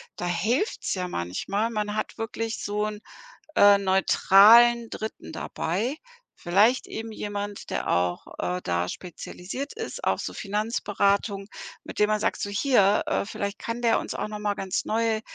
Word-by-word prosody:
da 175 - -5
hilft's 215 - 0
ja 180 -2 -3
manchmal. 175 - -2
Man 210 -2 -2
hat 215 - -3
wirklich 225 0 -4
so 210 +1 -1
'n, 210 -1 -5 0.6
äh, 205 0 +7
neutralen 210 +4 +6
Dritten 220 0 -6
dabei. 215 - -2 0.4
Vielleicht 205 +8 +3
eben 225 0 -6
jemand, 205 -1 -5
der - - -3
auch, 90 0 0
äh, 180 0 -1
da 85 +1 -1
spezialisiert 190 - -7
ist 450 0 -6
auf - - +1
so - - -5
Finanzberatung, 200 -1 -1 0.4
mit - - -9
dem 210 0 +3
man 215 0 +1
sagt, 225 - -1
so 205 - -2
hier, 205 -2 +3
äh, - - 0
vielleicht 200 0 -4
kann 230 +1 -5
der 230 -1 +3
uns - - -6
auch - - -3
noch 210 0 -6
mal 210 -1 0
ganz 190 -2 -2
neue 225 0 0
210 Hz, 160 wpm, -26 LUFS, 195-225 Hz, 0.6 s, äh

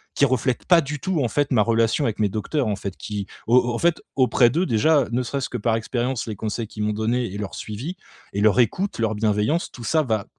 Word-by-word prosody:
qui 140 - +4
reflètent 130 -1 0
pas 175 -2 +6
du 150 +1 -5
tout, 180 -4 -1
en - - +1
fait, 145 +4 0
ma 120 -5 +4
relation 115 +5 +2
avec 110 -2 -1
mes 105 -1 +2
docteurs, 110 +7 -1
en 105 - 0
fait. 100 -2 -5
Qui 100 -2 -5 0.2
au 120 +2 +5
au - - -3
en - - -1
fait, 170 -1 +2
auprès 125 -2 +4
d'eux, 170 +9 0
déjà, 140 +3 +3
ne 120 +2 +1
serait-ce 135 +2 -3
que 125 - -3
par 115 0 +1
expérience, 120 +2 -2
les 110 - -4
conseils 110 +2 -3
qu'ils 105 0 -5
m'ont 105 0 0
donné 115 +4 0
et - - -5
leur 105 -2 -5
suivi 125 - -6 0.4
et 100 - -1
leur 110 +3 +4
écoute, 185 - +1
leur 110 -1 +1
bienveillance 110 - 0
tout 120 - -10
ça, 160 +7 +2
va 110 -6 -1
120 Hz, 250 wpm, -23 LUFS, 110-140 Hz, 0.4 s, pas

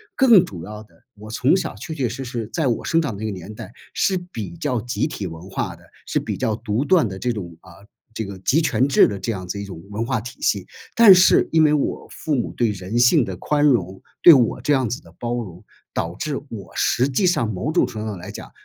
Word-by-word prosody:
更 235 - +6
主 85 - -9
要 105 +3 -8
的， 110 - -26
我 105 +1 -12
从 130 +8 +2
小 190 - -3
确 160 - -7
确 135 -5 -1
实 130 +4 -6
实， 120 -3 -5
在 160 -5 0
我 120 - -1
生 165 - +2
长 135 -9 -3
那 110 - -5
个 110 - -2
年 95 +2 -8
代， 110 - -10 0.2
是 190 - +1
比 145 - -7
较 125 -6 -1
集 120 +6 -2
体 105 -10 -5
文 80 +3 -10
化 - - -3
的， - - -20 0.2
是 - - 0
比 - - -4
较 110 - 0
独 110 +2 -2
断 175 -5 +4
的 95 -2 -7
这 125 - -1
种， 90 -7 -6
啊， - - -17 0.5
这 110 - -3
个 100 -1 -8
集 135 +10 +2
权 135 -5 +1
制 135 - +6
的 100 - -4
这 105 +5 -2
样 95 -4 -6
子 100 +3 -4
一 - - -5
种 95 -5 -9
文 105 +2 -2
化 125 0 -1
体 120 +4 -10
系。 100 -3 0 0.3
但 230 -4 +9
是 185 +1 +5
因 160 -1 +5
为 150 - +4
我 150 - -1
父 155 - -4
母 120 - -2
对 115 -3 0
人 100 +3 -4
性 125 +4 +5
的 95 -4 -5
宽 145 +9 0
容， 95 -9 +1 0.2
对 170 - +11
我 125 -6 +2
这 150 - +1
样 130 -4 +1
子 125 - -4
的 85 0 -18
包 120 0 -2
容， 95 -8 -7 0.3
导 85 +1 -3
致 150 +6 -3
我 105 -5 -9
实 125 +2 +2
际 140 +8 +1
上， 170 -10 +1
某 110 +11 -2
种 175 - +3
程 110 - -6
度 110 - -4
上 105 -3 -4
来 90 - -9
讲， - - -10
115 Hz, 275 characters per minute, -21 LUFS, 100-145 Hz, 0.5 s, 对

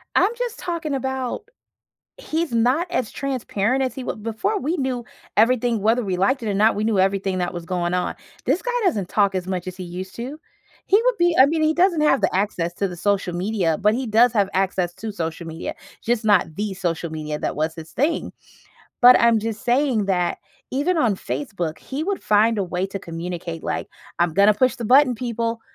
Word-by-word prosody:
I'm 405 - +4
just 485 -2 -3
talking 335 -4 -3
about 265 - -3 0.7
he's 335 - -2
not 250 +9 +2
as 250 -10 -1
transparent 260 -2 -1
as 260 -1 -1
he 265 - -5
w 220 - -5
before 230 - -1
we 325 0 -1
knew 255 -4 -2 0.3
everything 235 +1 +3
whether 225 +4 +2
we 190 -3 -2
liked 250 +7 +1
it 220 - -2
or - - 0
not, 215 +3 +3
we 210 - -1
knew 215 -3 +1
everything 195 0 +1
that 180 0 -2
was 175 -1 -6
going 175 -1 -1
on. 180 0 -1 0.3
This 280 +8 +1
guy - - -2
doesn't 210 - 0
talk 200 -2 +2
as 185 -1 -2
much 185 -1 -3
as 185 - -5
he 185 - -6
used 180 +2 -7
to. 255 +6 -6 0.5
He 405 +3 +4
would - - +3
be 345 -2 +3
I 260 - +9
mean, 315 +3 0
he 310 0 +3
doesn't 350 -2 +3
have 300 - +3
the 195 - +1
access 185 -3 -1
to 200 - 0
the 180 - -7
social 200 -1 0
media, 180 -4 0
but 210 +1 +3
he 255 +2 -2
does 225 +3 +5
have 200 -4 +2
access 185 -2 0
to 220 -1 -5
social 165 -2 -4
media, 160 +1 -5 0.3
just 235 -1 -1
not 205 -7 +3
the 205 +1 -2
social 170 -2 -2
media 155 -1 -4
that - - -2
was 155 +2 -1
his 160 -1 -10
thing. 310 +5 -1 0.7
But 250 +1 +9
I'm 230 -1 +5
just 220 0 -4
saying 245 -4 +2
that 180 -2 0 0.3
even 310 +7 0
on 230 -9 +2
Facebook, 180 - -4
he 285 +4 -5
would 400 0 -2
find 215 +1 +3
a 200 - +1
way 180 +1 -2
to 195 - -5
communicate, 170 -1 -6
like, - - -3 0.3
"I'm 175 -1 +2
gonna 200 +1 +5
push 255 +3 +2
the 235 - -5
button 255 +2 +5
people. 230 -1 -3
220 Hz, 210 wpm, -22 LUFS, 185-265 Hz, 0.7 s, I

